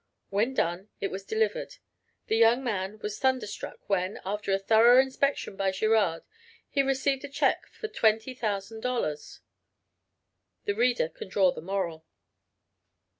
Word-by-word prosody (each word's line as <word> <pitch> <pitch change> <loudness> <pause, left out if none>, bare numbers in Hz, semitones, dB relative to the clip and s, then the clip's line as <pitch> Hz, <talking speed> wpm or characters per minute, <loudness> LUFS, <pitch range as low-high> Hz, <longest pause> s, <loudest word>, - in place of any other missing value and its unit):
When 220 +7 +1
done 175 +2 -1
it 195 - -2
was 195 +1 -5
delivered. 450 +3 -1 0.5
The - - 0
young 230 +3 +4
man 205 -3 -2
was 210 0 -4
thunderstruck 260 -6 -2
when, 190 -1 0
after 205 +1 -2
a 195 - +4
thorough 225 +5 +6
inspection 265 -4 0
by 195 0 +1
Girard, 200 -4 +1 0.4
he 280 - +1
received 270 0 0
a 285 - -6
check 275 - +1
for 440 - -7
$20,000; 220 - -1 1.3
the 205 - +1
reader 240 -5 +2
can 165 - -10
draw 190 -1 +4
the - - -8
moral. 170 -3 -3
215 Hz, 130 wpm, -28 LUFS, 195-255 Hz, 1.3 s, thorough